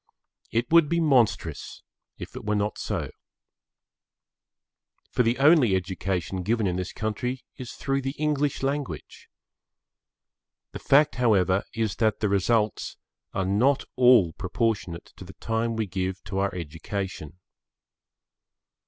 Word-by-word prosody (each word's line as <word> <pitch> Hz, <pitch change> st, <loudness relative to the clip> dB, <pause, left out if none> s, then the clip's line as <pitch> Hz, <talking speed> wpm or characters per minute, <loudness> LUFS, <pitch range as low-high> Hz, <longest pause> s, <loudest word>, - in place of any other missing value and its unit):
It 115 Hz, +4 st, -1 dB
would 165 Hz, -3 st, +6 dB
be 170 Hz, -, +1 dB
monstrous 135 Hz, -9 st, +1 dB, 0.3 s
if -, -, -9 dB
it -, -, -7 dB
were 105 Hz, 0 st, 0 dB
not 105 Hz, 0 st, -1 dB
so. -, -, -3 dB, 2.0 s
For -, -, +2 dB
the 120 Hz, 0 st, +2 dB
only 140 Hz, -, +5 dB
education 95 Hz, 0 st, -2 dB
given 110 Hz, +3 st, 0 dB
in 90 Hz, -2 st, 0 dB
this 90 Hz, 0 st, -3 dB
country 120 Hz, +4 st, -3 dB
is 125 Hz, -3 st, -7 dB
through 135 Hz, 0 st, -1 dB
the 135 Hz, +2 st, -4 dB
English 145 Hz, -2 st, 0 dB
language. 140 Hz, 0 st, -4 dB, 1.4 s
The -, -, -7 dB
fact, 145 Hz, +1 st, +3 dB
however, 100 Hz, -5 st, +3 dB
is 110 Hz, -3 st, -1 dB
that 110 Hz, -2 st, +1 dB
the 105 Hz, -, 0 dB
results 105 Hz, +2 st, 0 dB, 0.4 s
are 95 Hz, -, 0 dB
not 120 Hz, +9 st, +2 dB
all 120 Hz, -10 st, +5 dB
proportionate 95 Hz, -3 st, -2 dB
to -, -, -9 dB
the -, -, -11 dB
time 115 Hz, 0 st, -2 dB
we 110 Hz, -1 st, -1 dB
give 95 Hz, 0 st, -3 dB
to 95 Hz, -1 st, -4 dB
our 100 Hz, -1 st, -1 dB
education. 85 Hz, 0 st, -5 dB
110 Hz, 130 wpm, -26 LUFS, 95-130 Hz, 2.0 s, would